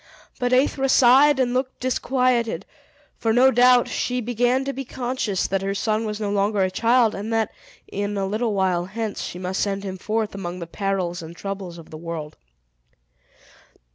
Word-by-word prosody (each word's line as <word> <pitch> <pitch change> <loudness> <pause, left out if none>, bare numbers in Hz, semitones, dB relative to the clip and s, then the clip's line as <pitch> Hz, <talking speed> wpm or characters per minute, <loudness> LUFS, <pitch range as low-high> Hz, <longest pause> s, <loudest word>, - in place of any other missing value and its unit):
But 245 0 0
Aethra 270 +1 +2
sighed, 265 +3 +6
and 245 -2 +1
looked 260 +1 -2
disquieted; 250 -2 0 0.5
for, 225 - +1
no 255 +3 +5
doubt, 245 0 +5
she 250 0 -1
began 245 +3 +1
to 275 - -2
be 270 - -5
conscious 245 -6 -2
that 195 0 -1
her 195 0 -2
son 215 +2 0
was 210 0 -4
no 205 -2 -2
longer 200 0 +1
a 185 - 0
child, 230 +3 +3
and 205 +3 -5
that, 225 -2 +1 0.4
in 205 +1 -3
a 195 - 0
little 215 +2 -1
while 185 -2 +1
hence, 215 +2 -4
she - - -5
must 185 +1 -3
send 200 -1 -1
him 190 -1 -5
forth 220 +2 -2
among 180 -2 -5
the 170 - -6
perils 185 -1 -2
and 165 +1 -9
troubles 195 -3 -6
of 165 - -13
the 155 - -8
world. 165 -3 -6
215 Hz, 180 wpm, -23 LUFS, 195-245 Hz, 0.5 s, sighed